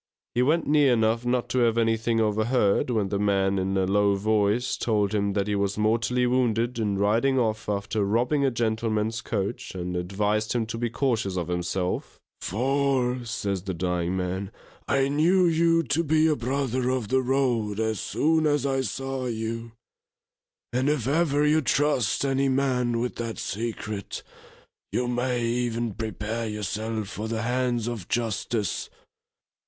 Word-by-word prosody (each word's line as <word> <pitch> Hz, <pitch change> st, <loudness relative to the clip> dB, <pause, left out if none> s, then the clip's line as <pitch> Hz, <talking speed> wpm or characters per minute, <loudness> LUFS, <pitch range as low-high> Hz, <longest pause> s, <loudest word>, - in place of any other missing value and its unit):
He 120 Hz, -, +2 dB
went 155 Hz, +6 st, +2 dB
near 145 Hz, -3 st, +4 dB
enough 115 Hz, +1 st, +1 dB
not 125 Hz, 0 st, +1 dB
to 130 Hz, -, +1 dB
have 115 Hz, -1 st, +3 dB
anything 115 Hz, 0 st, +1 dB
overheard, 110 Hz, +1 st, +2 dB
when 110 Hz, -5 st, 0 dB
the 100 Hz, 0 st, -1 dB
man 100 Hz, -1 st, +2 dB
in 95 Hz, +1 st, -1 dB
a 95 Hz, -, +2 dB
low 100 Hz, +1 st, +3 dB
voice, 105 Hz, +3 st, +1 dB
told 105 Hz, -3 st, 0 dB
him 100 Hz, -1 st, 0 dB
that 100 Hz, -1 st, 0 dB
he 105 Hz, -, -1 dB
was 100 Hz, 0 st, 0 dB
mortally 115 Hz, +3 st, +1 dB
wounded 120 Hz, -1 st, +1 dB
in 105 Hz, -3 st, 0 dB
riding 115 Hz, +7 st, +2 dB
off 110 Hz, -3 st, 0 dB
after 105 Hz, +1 st, -1 dB
robbing 120 Hz, +8 st, +1 dB
a 135 Hz, -, +4 dB
gentleman's 110 Hz, -2 st, -1 dB
coach, 100 Hz, -3 st, -3 dB
and 90 Hz, 0 st, -4 dB
advised 105 Hz, +4 st, -1 dB
him 120 Hz, -2 st, 0 dB
to 115 Hz, +1 st, -5 dB
be 120 Hz, 0 st, -1 dB
cautious 115 Hz, -7 st, -1 dB
of 90 Hz, -1 st, -2 dB
himself, 90 Hz, +1 st, -2 dB, 0.2 s
For, 130 Hz, +2 st, 0 dB
says 100 Hz, -5 st, -2 dB
the 95 Hz, -1 st, -4 dB
dying 90 Hz, +1 st, -1 dB
man, 95 Hz, +1 st, -3 dB, 0.4 s
_I 135 Hz, 0 st, +2 dB
knew 175 Hz, +6 st, +4 dB
you 165 Hz, 0 st, +3 dB
to 155 Hz, +3 st, 0 dB
be 155 Hz, 0 st, +3 dB
a 155 Hz, -1 st, +3 dB
brother 130 Hz, 0 st, -1 dB
of 130 Hz, -5 st, -1 dB
the 130 Hz, +1 st, +3 dB
road 125 Hz, -5 st, 0 dB
as 110 Hz, -1 st, 0 dB
soon 160 Hz, 0 st, +1 dB
as 145 Hz, -2 st, +1 dB
I 135 Hz, -1 st, +1 dB
saw 135 Hz, 0 st, -3 dB
you; 115 Hz, 0 st, -4 dB, 1.0 s
and 130 Hz, +3 st, +1 dB
if 140 Hz, -6 st, 0 dB
ever 150 Hz, -1 st, +2 dB
you 155 Hz, +1 st, +4 dB
trust 140 Hz, -3 st, +1 dB
any 135 Hz, 0 st, +1 dB
man 125 Hz, -3 st, +1 dB
with 125 Hz, +1 st, -3 dB
that 115 Hz, -4 st, -4 dB
secret, 110 Hz, -1 st, -4 dB, 0.7 s
you 125 Hz, -, 0 dB
may 125 Hz, 0 st, 0 dB
even 120 Hz, -1 st, -1 dB
prepare 110 Hz, +2 st, -3 dB
yourself 105 Hz, +1 st, -3 dB
for 105 Hz, +2 st, -5 dB
the 110 Hz, 0 st, -2 dB
hands 120 Hz, -1 st, 0 dB
of 115 Hz, -7 st, -5 dB
justice. 115 Hz, -3 st, -2 dB
115 Hz, 160 wpm, -26 LUFS, 105-130 Hz, 1.0 s, near